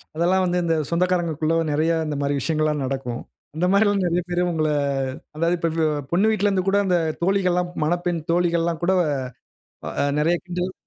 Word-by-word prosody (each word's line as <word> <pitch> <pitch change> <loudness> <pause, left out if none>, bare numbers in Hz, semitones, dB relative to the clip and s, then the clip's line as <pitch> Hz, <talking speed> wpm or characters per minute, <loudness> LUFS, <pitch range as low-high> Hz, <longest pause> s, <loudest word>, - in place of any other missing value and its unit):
அதெல்லாம் 180 +3 +2
வந்து 180 0 0
இந்த 165 -1 +1
சொந்தக்காரங்ககுள்ள 170 -3 0 0.2
நெறைய 155 +3 +1 0.2
இந்த 150 - -2
மாரி 140 0 0
விஷயங்கள்லாம் 155 -1 0
நடக்கும். 130 -2 -4 0.4
இந்த 175 - +1
மாதிரிலாம் 200 -1 +3
நெறைய 175 0 +1
பேரு 175 0 0
உங்கள, 155 -2 0 0.7
அதாவது 165 +3 +1
இப்ப 165 -2 0 0.2
பொண்ணு 195 +6 +3
வீட்டிலேருந்துகூட 195 -2 +1
அந்த 180 -2 +2 0.3
தோழிகள்லாம் 180 -2 +1
மணப்பெண் 175 +1 0
தோழிகள்லாம் 170 -1 +1
கூட 185 +2 +3 1.0
அ - - -2 0.2
நெறைய 165 +3 +2
கிண்டல் 180 0 -3
175 Hz, 145 wpm, -23 LUFS, 160-180 Hz, 1.0 s, மாதிரிலாம்